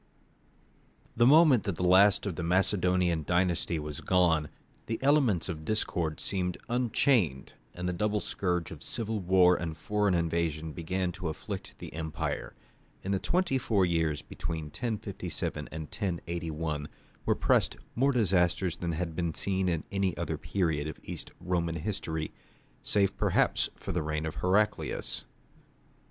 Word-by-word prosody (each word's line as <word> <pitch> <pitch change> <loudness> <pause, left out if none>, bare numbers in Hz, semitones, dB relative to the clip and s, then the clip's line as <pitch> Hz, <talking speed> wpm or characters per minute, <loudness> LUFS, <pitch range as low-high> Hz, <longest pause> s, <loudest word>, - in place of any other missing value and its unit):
The 120 +1 +5
moment 150 -4 +7
that 100 - -1
the 90 - -1
last 100 +3 +6
of 100 -5 -2
the 90 - -4
Macedonian 90 -1 +2
dynasty 85 0 +1
was 75 -2 -5
gone, 85 -5 +3 0.4
the 115 - -1
elements 135 - +3
of 80 -4 -5
discord 85 -5 -1
seemed 90 -2 -2
unchained, 120 - +1 0.2
and 90 +1 -3
the 90 - 0
double 105 +3 0
scourge 90 -4 -2
of - - -9
civil 110 -1 -2
war 90 -1 +5
and 80 -2 -4
foreign 105 -3 +1
invasion 80 -2 -1
began 90 +2 -2
to 90 0 -5
afflict 80 - -6
the - - -9
empire. 80 0 -3 0.5
In 95 - -2
the 95 - +1
twenty 175 - +1
four 100 -6 +2
years 80 -4 0
between 80 -2 -5
1057 110 +4 -4
and 80 0 -5
1081 80 -3 -3 0.4
were - - +2
pressed - - +2 0.2
more 135 +4 +3
disasters 90 -6 +2
than 85 -1 -2
had 80 0 -3
been 85 -2 -1
seen 95 -1 0
in 85 -2 -1
any 95 -2 0
other 80 -3 -2
period 75 -2 0
of 80 - -7
East - - -6
Roman 85 -2 -1
history, 80 -3 -3 0.5
save 100 -2 +1
perhaps - - +2
the 90 - -2
reign 75 0 -2
of 80 - -3
Heraclius. 100 +4 0
90 Hz, 145 wpm, -30 LUFS, 80-100 Hz, 0.5 s, moment